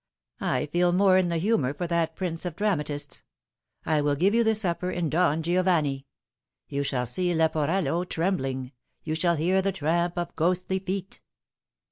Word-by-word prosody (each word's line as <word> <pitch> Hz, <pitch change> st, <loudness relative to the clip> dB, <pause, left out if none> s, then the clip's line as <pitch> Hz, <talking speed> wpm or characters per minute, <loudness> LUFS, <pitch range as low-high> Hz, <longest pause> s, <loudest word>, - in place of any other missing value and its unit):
" -, -, -50 dB
I 130 Hz, +3 st, 0 dB
feel 175 Hz, +4 st, +1 dB
more 185 Hz, 0 st, +5 dB
in 180 Hz, -2 st, +1 dB
the 170 Hz, -, 0 dB
humour 160 Hz, -, +1 dB
for 175 Hz, -, -3 dB
that 165 Hz, -1 st, 0 dB
prince 170 Hz, -3 st, -3 dB
of 175 Hz, -3 st, -4 dB
dramatists. 150 Hz, -8 st, -2 dB, 0.6 s
I 155 Hz, -2 st, +2 dB
will 145 Hz, 0 st, +1 dB
give 185 Hz, +8 st, +2 dB
you 235 Hz, +1 st, +4 dB
the 220 Hz, -1 st, +2 dB
supper 180 Hz, -3 st, -1 dB
in 175 Hz, -4 st, -2 dB
Don 160 Hz, -2 st, +2 dB
Giovanni. 165 Hz, -6 st, +1 dB, 0.6 s
You 140 Hz, -, -2 dB
shall 130 Hz, -3 st, -1 dB
see 175 Hz, +8 st, 0 dB
Leporello 160 Hz, +2 st, +1 dB
trembling. 135 Hz, -8 st, -1 dB, 0.3 s
You 155 Hz, -, -3 dB
shall 170 Hz, +2 st, +2 dB
hear 180 Hz, +5 st, +2 dB
the 195 Hz, +1 st, 0 dB
tramp 170 Hz, +1 st, -1 dB
of 175 Hz, -1 st, -3 dB
ghostly 180 Hz, +3 st, 0 dB
feet." 190 Hz, 0 st, -4 dB
170 Hz, 170 wpm, -26 LUFS, 150-185 Hz, 0.6 s, more